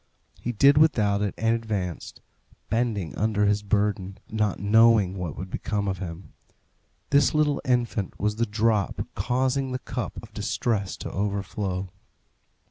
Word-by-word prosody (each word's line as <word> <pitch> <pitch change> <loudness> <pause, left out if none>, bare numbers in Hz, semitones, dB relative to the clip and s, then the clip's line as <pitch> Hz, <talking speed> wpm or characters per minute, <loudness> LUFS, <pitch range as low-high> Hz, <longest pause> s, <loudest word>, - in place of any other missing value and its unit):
He 120 - -3
did 140 +6 +5
without 105 -10 +3
it 105 -2 -1
and 115 +1 +2
advanced, 105 -7 -4 0.5
bending 110 -7 -1
under 105 -1 +1
his 105 0 +2
burden, 100 -2 0
not 105 -2 0
knowing 105 -2 +5
what 90 -6 -4
would 95 +1 -6
become 100 -2 -2
of 95 -1 -2
him. 85 -1 -7 0.8
This 145 +2 +4
little 150 -2 +2
infant 120 -5 0
was 105 +1 0
the 115 - +1
drop 105 -2 0
causing 130 +5 0
the - - 0
cup - - -5
of - - -13
distress 100 -5 -1
to - - -6
overflow. 95 -1 -2
105 Hz, 140 wpm, -26 LUFS, 100-115 Hz, 0.8 s, did